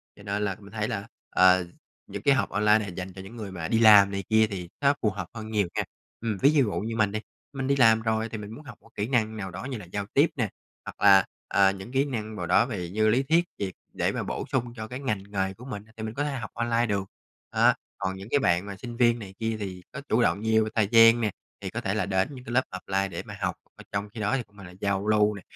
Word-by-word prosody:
Cho 100 Hz, -, -15 dB
nên 100 Hz, 0 st, -2 dB
là 100 Hz, -2 st, -1 dB
mình 100 Hz, -1 st, -14 dB
thấy 105 Hz, -1 st, -1 dB
là, 100 Hz, 0 st, -4 dB, 0.2 s
ờ, 90 Hz, 0 st, +5 dB, 0.4 s
những -, -, -6 dB
cái 140 Hz, -, +4 dB
học 130 Hz, -, 0 dB
online 105 Hz, +1 st, +4 dB
nà 105 Hz, -, -4 dB
dành 90 Hz, 0 st, -6 dB
cho 95 Hz, -, -9 dB
những 95 Hz, +5 st, -11 dB
người 105 Hz, -4 st, -6 dB
mà 85 Hz, -3 st, -4 dB
đi 115 Hz, -, +2 dB
làm 105 Hz, -3 st, +8 dB
này 100 Hz, 0 st, -3 dB
kia 110 Hz, 0 st, +5 dB
thì 90 Hz, -4 st, -6 dB
nó 140 Hz, 0 st, +5 dB
phù 110 Hz, -, +3 dB
hợp 95 Hz, -3 st, -5 dB
hơn 110 Hz, -1 st, -7 dB
nhiều 105 Hz, -4 st, +1 dB
nha. -, -, +1 dB, 0.4 s
Ừm, 110 Hz, -3 st, -2 dB
ví 135 Hz, -, +5 dB
d -, -, +2 dB
dụ 125 Hz, -7 st, +3 dB
như 115 Hz, +2 st, -3 dB
mình 110 Hz, -3 st, +2 dB
đi, 110 Hz, -, -2 dB, 0.3 s
mình 135 Hz, -1 st, -3 dB
đi 140 Hz, -, +3 dB
làm 115 Hz, -4 st, +5 dB
rồi 110 Hz, 0 st, 0 dB
thì 110 Hz, -, -5 dB
mình 105 Hz, 0 st, -8 dB
muốn 140 Hz, +7 st, -10 dB
học -, -, -10 dB
một -, -, -20 dB
kỹ 105 Hz, +1 st, -2 dB
năng 110 Hz, -4 st, 0 dB
nào 95 Hz, -3 st, -5 dB
đó 90 Hz, +6 st, -7 dB
như 130 Hz, -2 st, -4 dB
là 105 Hz, -, -9 dB
giao 100 Hz, +3 st, -4 dB
tiếp 145 Hz, +4 st, +5 dB
nè, 115 Hz, -7 st, -1 dB, 0.4 s
hoặc -, -, -9 dB
là, 100 Hz, -2 st, +7 dB, 0.2 s
ờ, 100 Hz, -1 st, +4 dB
những 95 Hz, +4 st, -8 dB
kỹ 135 Hz, +2 st, +2 dB
năng 110 Hz, -6 st, -4 dB
vào 90 Hz, -, -4 dB
đó 115 Hz, -, +4 dB
về 95 Hz, -8 st, -4 dB
như 110 Hz, +4 st, +1 dB
lý 125 Hz, +5 st, +3 dB
thuyết 165 Hz, +5 st, +3 dB
gì, 100 Hz, -2 st, -3 dB, 0.2 s
để -, -, 0 dB
mà -, -, -3 dB
bổ -, -, -4 dB
sung 120 Hz, -2 st, -1 dB
cho 110 Hz, -1 st, -6 dB
cái 125 Hz, +3 st, -6 dB
ngành 105 Hz, -8 st, -2 dB
nghề 95 Hz, -1 st, -1 dB
của 115 Hz, +6 st, -13 dB
mình, 105 Hz, -6 st, -6 dB
thì 110 Hz, -, -5 dB
mình 110 Hz, 0 st, -4 dB
có 145 Hz, -, -1 dB
thể 145 Hz, -, -1 dB
học 115 Hz, -5 st, -5 dB
online 120 Hz, 0 st, +1 dB
được. 100 Hz, -3 st, -1 dB, 0.5 s
Đó, -, -, +5 dB, 0.2 s
còn 95 Hz, -1 st, -2 dB
những 95 Hz, +1 st, -9 dB
cái 145 Hz, -, +3 dB
bạn 85 Hz, -6 st, +2 dB
mà 100 Hz, -1 st, -6 dB
sinh 120 Hz, +3 st, -8 dB
viên 120 Hz, -1 st, +4 dB
này 100 Hz, -3 st, -9 dB
kia 110 Hz, -1 st, -1 dB
thì 95 Hz, -3 st, -5 dB
có 140 Hz, -, -7 dB
chủ 115 Hz, -, +3 dB
động 95 Hz, -2 st, +2 dB
nhiều 110 Hz, 0 st, +3 dB
về 110 Hz, -, -3 dB
thời 110 Hz, -3 st, +3 dB
gian 115 Hz, 0 st, +7 dB
nè, 110 Hz, -2 st, +1 dB, 0.3 s
thì -, -, -4 dB
có -, -, -4 dB
thể -, -, -1 dB
là -, -, 0 dB
đến 95 Hz, +2 st, +1 dB
những 125 Hz, -, -10 dB
cái 115 Hz, -, -6 dB
lớp 130 Hz, +1 st, +4 dB
offline 95 Hz, +1 st, -2 dB
để 85 Hz, -, -5 dB
mà -, -, -9 dB
học. -, -, -1 dB, 0.2 s
Ờ, -, -, -13 dB
trong 100 Hz, +1 st, -2 dB
khi 115 Hz, -, -7 dB
đó 105 Hz, +5 st, +1 dB
thì 125 Hz, -, -3 dB
cũng 100 Hz, -2 st, -26 dB
là 100 Hz, -, -11 dB
là 90 Hz, 0 st, -11 dB
giao 100 Hz, 0 st, 0 dB
lưu 105 Hz, -1 st, +3 dB
nè, 100 Hz, -, -9 dB
105 Hz, 295 wpm, -27 LUFS, 100-115 Hz, 0.5 s, làm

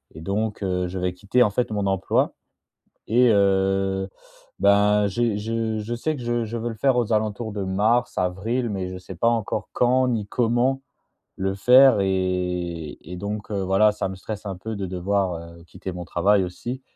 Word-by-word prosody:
et -, -, -8 dB
donc, 105 Hz, +5 st, -2 dB
heu 90 Hz, -1 st, -1 dB
je 95 Hz, +1 st, -5 dB
vais 90 Hz, 0 st, -1 dB
quitter 105 Hz, +7 st, +2 dB
en 105 Hz, -, +2 dB
fait 115 Hz, +3 st, -1 dB
mon 105 Hz, -2 st, -1 dB
emploi, 95 Hz, -1 st, +1 dB, 0.7 s
et 120 Hz, +2 st, +4 dB
heu, 95 Hz, -1 st, +2 dB, 0.5 s
ben, 100 Hz, +1 st, +4 dB
j'ai 110 Hz, +2 st, 0 dB
je 110 Hz, +1 st, -2 dB
je 110 Hz, +3 st, -4 dB
sais 155 Hz, +6 st, -2 dB
que -, -, -8 dB
je 120 Hz, 0 st, -1 dB
je 115 Hz, +2 st, -4 dB
veux 115 Hz, +1 st, -3 dB
le 115 Hz, -, -6 dB
faire 130 Hz, +4 st, +2 dB
aux 115 Hz, -2 st, +1 dB
alentours 110 Hz, +1 st, -1 dB
de 100 Hz, -1 st, -3 dB
mars, 110 Hz, +6 st, +1 dB
avril, 110 Hz, +7 st, -1 dB
mais 95 Hz, -3 st, -3 dB
je 95 Hz, -, -6 dB
sais 95 Hz, +1 st, -10 dB
pas 90 Hz, -, +1 dB
encore 115 Hz, -3 st, -2 dB
quand 130 Hz, +1 st, +3 dB
ni 110 Hz, -4 st, -1 dB
comment 120 Hz, +4 st, +1 dB, 0.6 s
le 95 Hz, 0 st, -1 dB
faire 125 Hz, +3 st, +6 dB
et 90 Hz, -4 st, -2 dB
et 90 Hz, +3 st, -9 dB
donc, 105 Hz, +3 st, -5 dB
heu, 100 Hz, -2 st, -1 dB
voilà 95 Hz, +3 st, +4 dB
ça 105 Hz, -, -3 dB
me 95 Hz, -, -6 dB
stresse 105 Hz, +2 st, -7 dB
un 95 Hz, -2 st, -4 dB
peu 110 Hz, +4 st, -6 dB
de 100 Hz, -1 st, -3 dB
devoir, 95 Hz, +1 st, -1 dB, 0.2 s
heu, 85 Hz, -, -16 dB
quitter 95 Hz, +2 st, -8 dB
mon 90 Hz, 0 st, -6 dB
travail 95 Hz, +4 st, +2 dB
aussi. 120 Hz, +8 st, -6 dB
100 Hz, 195 wpm, -23 LUFS, 95-115 Hz, 0.7 s, faire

